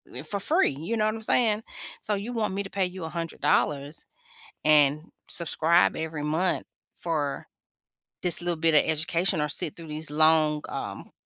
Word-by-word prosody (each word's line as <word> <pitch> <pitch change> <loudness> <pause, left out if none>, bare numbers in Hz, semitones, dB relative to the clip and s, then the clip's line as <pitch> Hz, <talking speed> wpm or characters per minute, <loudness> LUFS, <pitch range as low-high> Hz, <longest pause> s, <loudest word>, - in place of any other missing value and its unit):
eh, - - -6
for 200 - -4
free. 320 - +2
You 205 +9 -3
know 215 - +2
what 215 - +1
I'm 220 - -7
saying? 220 -1 +2 0.4
"So 210 -2 -1
you 215 +5 -5
want 215 -5 -1
me 200 - -2
to 195 - -9
pay 195 -2 0
you 180 -1 -8
$100 160 -3 -1 0.6
and 150 -1 +5 0.3
subscribe 170 0 +2
every 160 -2 -4
month 165 +5 0 0.3
for 150 -5 -3 0.8
this 175 -1 +4
little 175 -1 -2
bit 165 -1 +2
of 150 - +6
education 165 +3 0
or 150 - 0
sit 160 0 -1
through 165 -1 -8
these 155 0 -3
long, 155 0 +3
um, - - -6
165 Hz, 170 wpm, -26 LUFS, 155-195 Hz, 0.8 s, of